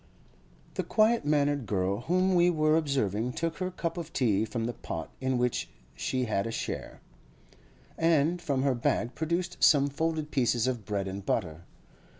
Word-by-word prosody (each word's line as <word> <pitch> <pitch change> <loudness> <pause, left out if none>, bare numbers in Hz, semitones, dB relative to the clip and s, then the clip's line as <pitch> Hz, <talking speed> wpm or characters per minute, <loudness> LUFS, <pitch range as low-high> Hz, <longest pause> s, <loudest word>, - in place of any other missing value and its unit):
The - - -2
quiet 220 -1 +2
mannered 145 -4 +1
girl 95 0 0
whom 185 +6 +2
we 175 0 +5
were 155 -2 +3
observing 125 - 0
took 165 +3 -2
her 185 -1 -2
cup 175 -1 -4
of 165 -1 -7
tea 110 -5 +2
from 115 0 -3
the 120 - -2
pot 80 -8 -6
in 130 -1 0
which 125 -1 0 0.2
she 130 -1 -1
had 105 -2 -1
a - - -3
share, - - -5 1.0
and 165 +1 +3
from 135 -5 0
her 140 -2 +3
bag 120 0 0
produced 170 +3 -2
some 140 -2 +6
folded 155 +1 -2
pieces 120 -3 +2
of 120 -5 -2
bread 100 -1 -2
and 95 +1 -5
butter. 85 -5 -2
135 Hz, 165 wpm, -29 LUFS, 115-160 Hz, 1.0 s, some